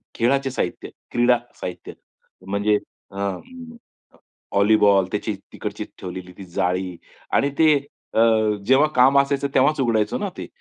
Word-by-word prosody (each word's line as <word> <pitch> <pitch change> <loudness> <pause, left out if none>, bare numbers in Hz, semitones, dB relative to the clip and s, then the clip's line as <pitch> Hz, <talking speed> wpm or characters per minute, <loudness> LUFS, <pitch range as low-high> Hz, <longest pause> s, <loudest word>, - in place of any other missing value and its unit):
खेळाचे 135 +3 +1
साहित्य, 90 - -3 0.2
क्रीडा 120 0 +4 0.2
साहित्य 90 0 -6 0.5
म्हणजे 100 +2 +1 0.4
अ, 95 - -15
म 240 - -6 0.8
व्हॉलीबॉल 100 -1 +4
त्याची 105 +1 -2 0.2
तिकडची, - - -5 0.2
ठेवलेली 90 0 -7
ती 100 - -9
जाळी 90 +1 -2 0.4
आणि 140 - +3
ते 155 -2 +6 0.4
अ, - - +1 0.5
जेव्हा 135 +5 +5
काम 135 +2 +6
असायचं 140 0 +1
तेव्हाच 145 +3 +3
उघडायचं 110 -4 +1
ना - - -2
ते. - - -6
110 Hz, 130 wpm, -22 LUFS, 95-135 Hz, 0.8 s, ते